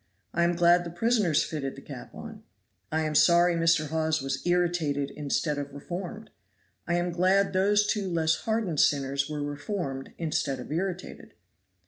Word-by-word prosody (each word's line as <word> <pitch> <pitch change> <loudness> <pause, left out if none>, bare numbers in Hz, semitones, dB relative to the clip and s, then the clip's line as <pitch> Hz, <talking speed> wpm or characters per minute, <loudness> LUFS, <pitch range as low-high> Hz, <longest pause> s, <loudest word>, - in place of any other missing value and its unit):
I 170 - +2
am 175 0 +1
glad 175 0 +5
the 170 - -6
prisoners 185 -3 +2
fitted 135 -4 -4
the - - -11
cap - - -10
on. - - -9 0.5
I 160 +1 +1
am 155 -1 -1
sorry 175 +3 +5
Mr. 165 -2 +2
Hawes 160 0 0
was 135 -1 -3
irritated 170 -6 +1
instead 150 0 -1
of 140 0 -5
reformed. 180 +9 -7 0.6
I 170 - +1
am 175 0 0
glad 185 +3 +2
those 205 +2 +3
two 205 -2 -1
less 165 -2 +1
hardened 220 -9 -1
sinners 140 0 +2
were 150 -1 -3
reformed 145 -2 -4
instead 150 -4 -1
of 125 - -8
irritated." 185 +2 -4
170 Hz, 160 wpm, -27 LUFS, 145-180 Hz, 0.6 s, glad